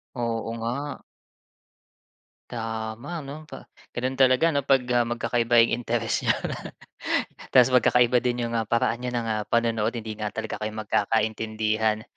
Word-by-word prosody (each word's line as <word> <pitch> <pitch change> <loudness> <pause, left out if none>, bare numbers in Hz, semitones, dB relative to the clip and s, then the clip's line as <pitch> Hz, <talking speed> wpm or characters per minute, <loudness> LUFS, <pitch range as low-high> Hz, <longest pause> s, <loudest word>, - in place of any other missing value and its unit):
Oo 115 -2 -2
nga. 140 +6 -4 1.5
Tama 115 +7 -4
'no, 145 +3 -9
pa - - -10 0.3
gano'n 130 +2 -2
talaga 130 +5 +5
'no 140 -3 -1
'pag, 135 -2 +4
ah, 120 -1 +3
magkakaiba 120 0 +3
yung 115 - +2
interes 120 -1 -1
niyo. - - +4 1.2
Ta's 125 0 +7
magkakaiba 125 0 +4
din 125 -1 0
yung, 115 - -4
ah, 110 - -1
paraan 115 +1 +1
niyo 125 - -2
ng, 120 - 0
ah, 110 -1 -1
panonood, 115 -1 +1
hindi 110 -2 -5
nga 105 -1 -2
talaga 110 0 -4
kayo 110 0 -2
magkakaintindihan. 110 0 0
115 Hz, 145 wpm, -25 LUFS, 110-125 Hz, 1.5 s, Ta's